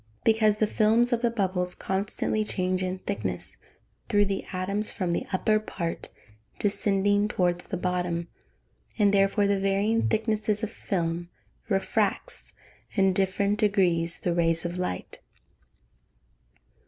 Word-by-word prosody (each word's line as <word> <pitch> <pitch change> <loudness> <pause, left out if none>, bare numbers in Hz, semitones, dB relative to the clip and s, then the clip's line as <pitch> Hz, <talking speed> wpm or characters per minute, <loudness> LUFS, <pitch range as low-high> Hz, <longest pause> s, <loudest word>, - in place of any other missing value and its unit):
_ - - -36
Because 220 -1 +3
the 215 - +3
films 225 +3 +3
of 235 - +1
the 240 - +3
bubbles 185 -5 0
constantly 200 +2 -1
change 185 -2 -1
in 185 0 -2
thickness, 200 +2 -4 0.5
through 205 -2 +4
the 195 -1 -2
atoms 195 +3 -2
from 185 -4 -2
the 170 - -2
upper 215 +3 +2
part 170 -5 -5 0.5
descending 205 0 +2
towards 175 -3 0
the - - -3
bottom, 180 -1 -1 0.7
and 205 -2 +4
therefore 200 +1 +3
the 200 -1 +2
varying 200 +3 +1
thickness 220 -1 0
of 220 - -2
film 175 -2 -2 0.4
refracts, 195 -2 -1 0.4
in 195 -2 +3
different 200 +2 +1
degrees, 175 -5 +2
the 175 - 0
rays 165 -1 +1
of 175 +1 -3
light. 90 - -4
195 Hz, 130 wpm, -27 LUFS, 180-210 Hz, 0.7 s, through